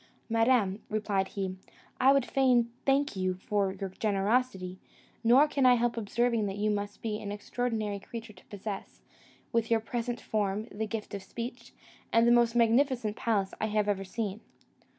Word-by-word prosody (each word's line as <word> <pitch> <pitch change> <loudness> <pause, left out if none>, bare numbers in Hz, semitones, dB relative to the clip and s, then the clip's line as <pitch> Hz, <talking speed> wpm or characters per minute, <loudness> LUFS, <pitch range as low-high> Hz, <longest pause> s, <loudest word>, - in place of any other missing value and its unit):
"Madam," 225 -3 +2
replied 205 -3 0
he, 190 -2 -4 0.4
"I 265 - +6
would 275 -2 +3
fain 250 -3 +3 0.2
thank 275 -2 +2
you 185 -1 0
for 195 +1 0
your 195 0 -5
generosity, 195 -2 0 0.4
nor 255 +6 +6
can 280 -2 0
I 250 -1 +7
help 240 0 +1
observing 230 0 0
that 195 0 -4
you 210 +1 +1
must 205 0 -4
be 215 -2 -2
an 205 - -5
extraordinary 215 -1 -2
creature 225 +2 -8
to 185 - -19
possess, 205 0 -7 0.5
with 230 -2 +1
your 230 -1 +4
present 235 +2 -3
form, 210 -1 -1
the 220 +1 -3
gift 215 -1 -5
of 200 - -4
speech, 235 +5 -7 0.4
and 230 0 +5
the - - +6
most 240 -1 +4
magnificent 235 -1 +3
palace 205 -5 0
I 220 - +1
have 210 -1 +1
ever 200 -1 0
seen." 205 +1 -4
220 Hz, 170 wpm, -30 LUFS, 200-240 Hz, 0.5 s, I